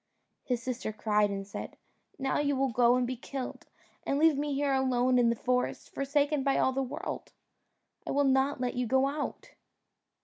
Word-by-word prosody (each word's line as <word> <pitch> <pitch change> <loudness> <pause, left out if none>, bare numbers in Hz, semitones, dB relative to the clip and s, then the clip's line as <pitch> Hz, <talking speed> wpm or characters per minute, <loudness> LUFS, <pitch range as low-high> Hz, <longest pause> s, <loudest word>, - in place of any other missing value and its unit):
His 245 -3 -2
sister 250 -3 -3
cried 210 -1 +1
and 195 0 -4
said, 200 - -7 0.4
"Now 270 -1 0
you 285 -1 +1
will 270 -1 +1
go 240 +1 +4
and 250 0 +1
be 255 +1 -3
killed, 260 +2 -6 0.4
and 275 - 0
leave 315 0 +5
me 290 0 -1
here 280 0 +1
alone 255 -1 +2
in 235 -1 +4
the 235 - +1
forest, 250 +2 -1
forsaken 285 +1 +1
by 275 0 +1
all 260 - +3
the 270 - 0
world; 270 +3 -5 0.7
I - - -3
will 285 +1 +2
not 270 0 +2
let 250 -1 -1
you 250 -1 -1
go 265 +3 +3
out." 290 +1 -4
260 Hz, 190 wpm, -30 LUFS, 245-275 Hz, 0.7 s, leave